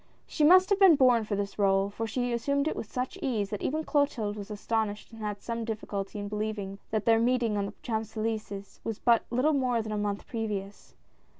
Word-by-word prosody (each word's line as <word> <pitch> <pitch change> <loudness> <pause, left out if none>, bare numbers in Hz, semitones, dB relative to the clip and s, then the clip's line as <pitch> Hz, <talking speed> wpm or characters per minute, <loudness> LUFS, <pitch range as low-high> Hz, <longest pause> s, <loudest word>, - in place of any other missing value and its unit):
She 305 - -1
must 370 +5 +7
have 400 - +3
been 380 -5 +8
born 250 -5 +4
for 210 - -2
this 200 0 -3
r61e, 195 0 +2
for 225 +1 -3
she 245 +2 -1
assumed 280 +5 0
it - - -1
with 210 - -6
such 260 +9 -3
ease, 220 - -1
that 210 - -3
even 310 +3 -1
Clotilde 275 -9 0
was 205 -1 -7
astonished 215 0 -2
and 225 -1 -11
had 205 -1 -4
some 230 -1 -3
difficulty 210 -2 -4
in 205 0 -4
believing 210 -2 -4
that 215 -1 -1
their 225 -1 +5
meeting 235 -2 +2
on 200 -1 -1
the 200 - -8
Champs 220 -1 -3
Elys^es 215 -2 -4
was 225 -2 -3
but 235 -1 +3
little 255 +6 +2
more 255 -4 +1
than 215 - -6
a 210 - -1
month 205 -1 -2
previous. 210 -4 -5
220 Hz, 215 wpm, -29 LUFS, 205-250 Hz, -, been